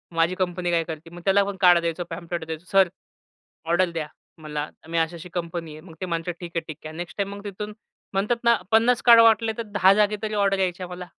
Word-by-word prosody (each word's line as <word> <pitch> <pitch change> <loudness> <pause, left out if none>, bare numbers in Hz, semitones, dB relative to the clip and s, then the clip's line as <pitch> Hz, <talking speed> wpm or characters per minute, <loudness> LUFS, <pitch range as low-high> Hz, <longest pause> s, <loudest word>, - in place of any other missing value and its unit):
माझी 165 +2 +2
कंपनी 180 -1 -1
काय 165 -1 +2
करते? 160 0 -8
मग 175 +1 -11
त्याला 200 +1 +4
पण 200 0 -4
कार्ड 175 -1 +7
द्यायचो. 170 +1 -2
पॅम्फलेट 170 0 -5
द्यायचो. 160 +2 -7
सर, 195 -1 +5 0.8
ऑर्डर 175 +1 +3
द्या 160 -2 -3 0.3
मला. 150 -1 -4 0.2
मी, 165 0 -3
अशी 165 +1 0
अशी 175 +2 -10
कंपनी 170 -2 -4
आहे. 155 - -11
मग - - -11
ते - - -1
म्हणतात, 170 0 -3
ठीक 175 -2 -7
आहे. 165 - +1
ठीक 155 0 -9
आहे. 155 - -9
नेक्स्ट 175 +1 -7
टाईम 200 0 -2
मग 200 - -10
तिथून 210 +1 -6 0.4
म्हणतात 210 +5 +1
ना 235 0 +5 0.2
50 230 +3 +4
कार्ड 230 -1 +9
वाटले, 225 0 +4
तर 230 - -2
दहा 205 -2 +4
जागा 210 0 +2
तरी 215 0 -2
ऑर्डर 195 -1 +2
यायच्या 180 -1 -1
मला. 180 0 -7
180 Hz, 230 wpm, -24 LUFS, 165-200 Hz, 0.8 s, कार्ड